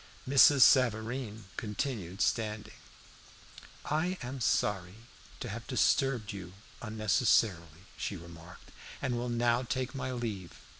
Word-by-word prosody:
Mrs. 140 Hz, +1 st, +6 dB
Savareen 115 Hz, -3 st, +2 dB
continued 105 Hz, -4 st, -4 dB
standing. 110 Hz, -3 st, -1 dB, 1.1 s
"I 175 Hz, +5 st, 0 dB
am 130 Hz, +1 st, -6 dB
sorry 95 Hz, -4 st, 0 dB, 0.5 s
to 120 Hz, -, -4 dB
have 115 Hz, +3 st, -7 dB
disturbed 130 Hz, -4 st, +1 dB
you 90 Hz, -2 st, -8 dB, 0.3 s
unnecessarily," 110 Hz, -, +1 dB
she 100 Hz, -, -3 dB
remarked 85 Hz, 0 st, -13 dB, 0.3 s
"and 130 Hz, -3 st, -1 dB
will 120 Hz, +1 st, -2 dB
now 120 Hz, 0 st, +2 dB
take 130 Hz, +1 st, -3 dB
my 130 Hz, -1 st, -4 dB
leave. 110 Hz, -8 st, -4 dB
115 Hz, 110 wpm, -31 LUFS, 100-130 Hz, 1.1 s, Mrs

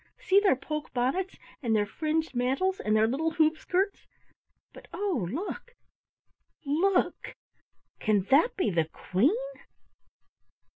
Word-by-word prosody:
See 390 Hz, +1 st, +4 dB
their 405 Hz, -8 st, +3 dB
poke 305 Hz, +3 st, -5 dB
bonnets, 270 Hz, +10 st, -1 dB, 0.3 s
and 230 Hz, -5 st, +1 dB
their 210 Hz, -1 st, +2 dB
fringed 315 Hz, +6 st, -2 dB
mantles, 270 Hz, +11 st, 0 dB
and 215 Hz, 0 st, 0 dB
their 215 Hz, 0 st, +4 dB
little 275 Hz, +8 st, 0 dB
hoop 315 Hz, -1 st, +3 dB
skirts, 385 Hz, +2 st, -1 dB, 0.7 s
but, -, -, -14 dB
oh, 360 Hz, -, -1 dB
look, 415 Hz, -, -5 dB, 0.9 s
look, 350 Hz, +7 st, 0 dB, 0.6 s
can 210 Hz, -3 st, +2 dB
that 305 Hz, -, +4 dB
be 370 Hz, -, +1 dB
the 165 Hz, -2 st, +1 dB
Queen?" 195 Hz, -, +1 dB
305 Hz, 120 wpm, -28 LUFS, 235-375 Hz, 0.9 s, See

